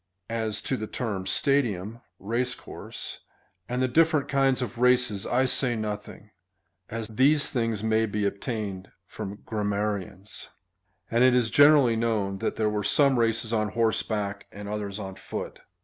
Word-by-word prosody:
As 110 -2 -2
to 130 - -1
the 110 - -4
term 105 -7 -3
stadium, 115 -3 +1 0.2
(race 115 +5 -1
course,) - - -7 0.5
and 125 +1 0
the - - +3
diiferent 155 +2 +3
kinds 135 -2 +2
of 120 -1 -6
races,^ 125 -5 +3
I 130 +2 +3
say 130 -1 +2
nothing, 105 -1 -6 0.6
as 115 -1 -4
these 140 +7 +2
things 115 -4 -1
may 110 0 +2
be 105 0 -1
obtained 100 -2 -3 0.2
from 100 +2 -7
grammarians, 105 -2 -3 0.6
and 120 +2 +4
it 130 -1 +6
is 120 -3 +2
generally 145 -5 +6
known 105 -4 0
that - - -1
there 110 - +1
were 105 0 0
some 140 +2 +4
races 115 0 +1
on 110 -1 0
horseback, 110 -3 -1
and 100 0 -8
others 105 -1 -4
on 95 -2 -6
foot. - - -6
110 Hz, 150 wpm, -27 LUFS, 105-125 Hz, 0.6 s, it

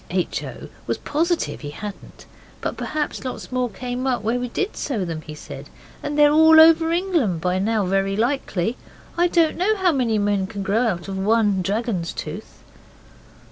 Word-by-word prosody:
H. - - -1
O. - - -8 0.2
was - - -1
positive 330 +3 -1
he 145 - -6
hadn't. 200 +7 -9 0.3
'But - - -3
perhaps 305 -3 -3
lots 255 0 -6
more 250 -1 0
came 250 +2 -4
up 245 -4 0
where 230 +3 0
we 250 - -2
did 390 - -3
sow 225 -10 -2
them,' 165 -2 -4
he 155 -1 -9
said; - - -10 0.3
'they're 295 0 +3
all 320 +1 +7
over 325 0 +6
England 335 - +1
by 180 +2 0
now 210 0 +1
very 195 +1 0
likely. 230 -3 -1 0.4
I 350 +1 +3
don't 335 -2 +2
know 410 +5 +2
how 375 -3 +2
many 245 -7 +1
men 205 -2 +1
can 200 -1 -5
grow 220 +5 +1
out 175 -4 -2
of 190 -1 -4
one 205 -1 +2
dragon's 200 -2 -2
tooth. - - -8
230 Hz, 180 wpm, -22 LUFS, 195-300 Hz, 0.4 s, all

